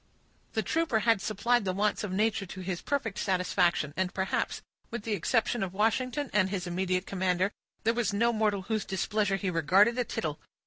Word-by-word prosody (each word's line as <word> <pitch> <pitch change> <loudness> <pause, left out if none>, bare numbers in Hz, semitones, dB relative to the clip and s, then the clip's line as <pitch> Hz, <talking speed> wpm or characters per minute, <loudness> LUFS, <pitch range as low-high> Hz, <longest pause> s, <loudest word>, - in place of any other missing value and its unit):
The - - 0
trooper 315 -9 +1
had 225 -2 +3
supplied 235 +3 +1
the 185 -2 -1
wants 210 +2 +1
of 205 - -3
nature 205 0 0
to 185 +2 -8
his 180 -1 -3
perfect 265 -8 -2
satisfaction; 180 -5 +1
and, 185 +2 0
perhaps, 190 0 -2 0.3
with 230 -2 -5
the 225 - -2
exception 225 +4 +1
of 190 -1 -3
Washington 255 +6 0
and 190 -3 +3
his 190 -2 -3
immediate 185 +1 -1
commander, 185 0 0 0.3
there 230 - +3
was 235 -3 0
no 230 +4 +2
mortal 210 -3 +1
whose 215 +1 -1
displeasure 200 +1 0
he 195 -1 -2
regarded 195 +9 +4
a - - +3
tittle. 155 -9 -3
200 Hz, 185 wpm, -29 LUFS, 185-225 Hz, 0.3 s, regarded